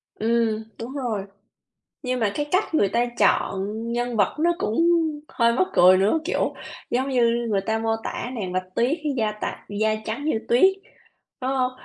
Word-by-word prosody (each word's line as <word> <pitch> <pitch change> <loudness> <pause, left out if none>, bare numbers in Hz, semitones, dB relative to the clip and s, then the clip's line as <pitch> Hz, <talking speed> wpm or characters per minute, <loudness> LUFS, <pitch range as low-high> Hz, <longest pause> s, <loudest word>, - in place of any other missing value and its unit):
Ừm, 225 -1 0
đúng 235 +3 -6
rồi. 235 -8 -3 0.8
Nhưng 255 0 -1
mà 210 -3 +1
cái 295 - -1
cách 370 -1 +1
người 205 -11 +3
ta 240 +3 +1
chọn 195 -1 +2 0.2
nhân 240 0 -2
vật 200 - +2
nó 345 +2 +3
cũng 330 - +1 0.4
hơi 235 -4 +2
mắc 370 +9 +2
cười 185 +1 +7
nữa. 205 +11 +2
Kiểu, - - 0 0.4
giống 260 +3 0
như 235 -2 +2
người 195 -2 +1
ta 220 +3 -1
mô 225 0 0
tả 245 - -4
nàng 190 -6 -4
Bạch 185 0 -4
Tuyết 255 +7 +2 0.2
da 215 -2 +1
tạ - - -5 0.2
da 215 0 +2
trắng 230 +7 -4
như 265 -8 +1
tuyết, 375 +11 +5 0.7
đúng 260 +1 -1
hông? 255 -1 +1
235 Hz, 180 wpm, -24 LUFS, 215-255 Hz, 0.8 s, cười